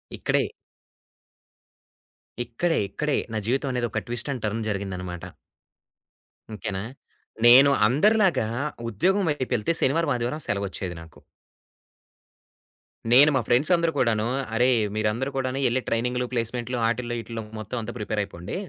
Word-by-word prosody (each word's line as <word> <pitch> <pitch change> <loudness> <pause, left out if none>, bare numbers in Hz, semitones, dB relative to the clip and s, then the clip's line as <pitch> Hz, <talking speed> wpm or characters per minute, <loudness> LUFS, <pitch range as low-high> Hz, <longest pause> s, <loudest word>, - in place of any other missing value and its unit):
ఇక్కడే. - - 0 2.0
ఇక్కడే, 165 +9 -1
ఇక్కడే, 150 +6 -1 0.2
నా - - -1
జీవితం 135 +2 0
అనేది 120 -2 -1
ఒక - - -2
ట్విస్ట్ 120 +3 -2
అండ్ 125 -5 -5
టర్న్ 110 +2 -2
జరిగిందనమాట. 90 -3 -4 1.3
ఓకేనా. 100 -1 -4 0.6
నేను 135 +4 +8 0.2
అందరిలాగా 190 - +3 0.4
ఉద్యోగం 190 - +1
వైపెళ్తే 130 -2 -1
శనివారం, 145 +2 +2
ఆదివారం 120 +6 -2
సెలవొచ్చేది 95 -3 -3
నాకు. 80 - -15 1.9
నేను 145 +4 +8
మా 130 - +3
ఫ్రెండ్స్ 130 +8 +3
అందరూ 170 -1 +1
కూడాను, 110 -4 +2 0.3
అరె, 125 +2 +4 0.3
మీరందరూ 110 +5 0
కూడాను 130 0 -1
వెళ్లి 125 +1 +1
ట్రైనింగ్లు, 125 +2 0
ప్లేస్మెంట్లు 120 +1 -2
వాటిల్లో, 120 +1 -1
ఇటిలో 115 -1 -6 0.2
మొత్తం 110 +4 -5
అంతా 115 +2 -5
ప్రిపేర్ 105 0 -3
అయిపోండి. 90 -1 -7
120 Hz, 120 wpm, -25 LUFS, 110-135 Hz, 2.0 s, నేను